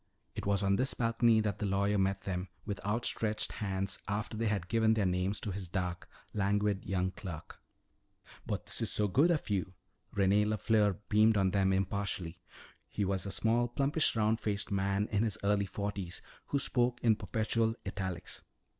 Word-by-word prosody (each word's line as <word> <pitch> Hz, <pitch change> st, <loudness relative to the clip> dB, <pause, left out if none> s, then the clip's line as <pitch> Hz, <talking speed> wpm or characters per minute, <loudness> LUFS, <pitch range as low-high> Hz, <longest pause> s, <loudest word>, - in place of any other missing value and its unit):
It -, -, -5 dB
was 100 Hz, -1 st, +2 dB
on 100 Hz, 0 st, +3 dB
this 130 Hz, +1 st, +1 dB
balcony 115 Hz, -1 st, +3 dB
that 105 Hz, -3 st, -2 dB
the 105 Hz, -, -1 dB
lawyer 100 Hz, +1 st, +1 dB
met 95 Hz, 0 st, +1 dB
them 90 Hz, -1 st, -3 dB, 0.2 s
with 100 Hz, -2 st, -4 dB
outstretched 110 Hz, 0 st, 0 dB
hands 95 Hz, -1 st, -2 dB
after 105 Hz, +3 st, -2 dB
they 115 Hz, +1 st, 0 dB
had 100 Hz, -5 st, -1 dB
given 110 Hz, +1 st, +3 dB
their 105 Hz, -3 st, +1 dB
names 90 Hz, +2 st, 0 dB
to 105 Hz, -, -3 dB
his 95 Hz, -1 st, -5 dB
dark, 90 Hz, -1 st, -3 dB, 0.2 s
languid 100 Hz, -1 st, +1 dB
young 95 Hz, 0 st, 0 dB
clerk. 95 Hz, -6 st, -8 dB, 0.9 s
"But -, -, -2 dB
this -, -, -2 dB
is -, -, -1 dB
good 155 Hz, +6 st, +5 dB
of 165 Hz, -4 st, +1 dB
you!" 95 Hz, -1 st, -1 dB, 0.4 s
René 100 Hz, +1 st, +3 dB
LeFleur 105 Hz, -2 st, +2 dB
beamed 110 Hz, +1 st, +5 dB
on 95 Hz, -1 st, +3 dB
them 95 Hz, -1 st, +2 dB
impartially. 95 Hz, -3 st, -1 dB, 0.5 s
He 100 Hz, -, -1 dB
was 95 Hz, 0 st, -1 dB
a -, -, -3 dB
small, 115 Hz, +4 st, +2 dB
plumpish, 140 Hz, +5 st, +1 dB
round 110 Hz, 0 st, +2 dB
faced 100 Hz, -1 st, -1 dB
man 100 Hz, +1 st, +1 dB
in 105 Hz, -1 st, +2 dB
his 110 Hz, -3 st, +1 dB
early 100 Hz, 0 st, +2 dB
forties, 100 Hz, -2 st, -4 dB, 0.2 s
who 140 Hz, -, 0 dB
spoke 125 Hz, -3 st, +1 dB
in 115 Hz, -2 st, +5 dB
perpetual 110 Hz, +2 st, 0 dB
italics. 95 Hz, -3 st, -4 dB
100 Hz, 170 wpm, -32 LUFS, 95-110 Hz, 0.9 s, good